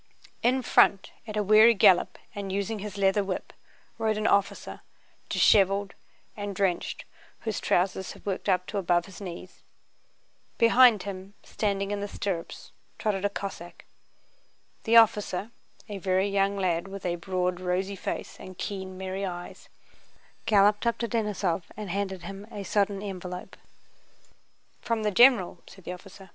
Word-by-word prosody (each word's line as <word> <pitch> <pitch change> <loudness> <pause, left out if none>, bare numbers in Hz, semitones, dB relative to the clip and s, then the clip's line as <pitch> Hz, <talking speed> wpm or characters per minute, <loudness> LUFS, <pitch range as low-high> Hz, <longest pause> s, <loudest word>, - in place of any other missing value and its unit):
In 255 +2 +2
front, 195 -3 +3 0.2
at 215 -1 -5
a 210 - +1
weary 215 +3 +7
gallop 185 -2 +4 0.2
and 200 -1 -5
using 200 +3 -2
his 205 0 -7
leather 195 +1 +2
whip, 190 -1 -5 0.5
rode 220 -1 0
an 215 - -2
officer, 200 -2 0 0.5
disheveled 195 0 +3 0.4
and 205 -1 -5
drenched, 185 -2 -1 0.4
whose 220 -6 -3
trousers 190 +1 0
had - - -17
worked 200 0 -2
up 180 -1 +2
to 205 - -3
above 175 -2 +1
his 195 +1 -12
knees. 180 -1 -9 1.0
Behind 230 -3 +6
him, 195 0 -8
standing 200 -1 -2
in 205 - -2
the 205 - -3
stirrups, 190 -4 -5 0.3
trotted 205 -3 -1
a - - +2
Cossack. 195 -4 -7 1.0
The 230 0 +3
officer, 210 -2 +3 0.4
a 205 -2 -6
very 190 +1 +1
young 200 0 +1
lad 180 -2 0
with 195 -1 -8
a 175 -1 -1
broad 180 0 -2
rosy 185 +2 -1
face - - -5
and 185 -1 -10
keen 190 -2 -5
merry 190 +1 -4
eyes, 175 -2 -7 0.8
galloped 210 +1 +4
up 235 - +1
to 235 - -2
Denísov 205 -7 -1
and 210 -4 -5
handed 190 -2 -3
him 200 +1 -8
a 200 - -6
sodden 200 0 0
envelope. 185 -1 -7 1.3
"From 230 -2 -1
the 210 - +1
general," 215 -6 +5
said 190 - -15
the 180 - -5
officer. 195 +1 -13
195 Hz, 150 wpm, -27 LUFS, 185-210 Hz, 1.3 s, weary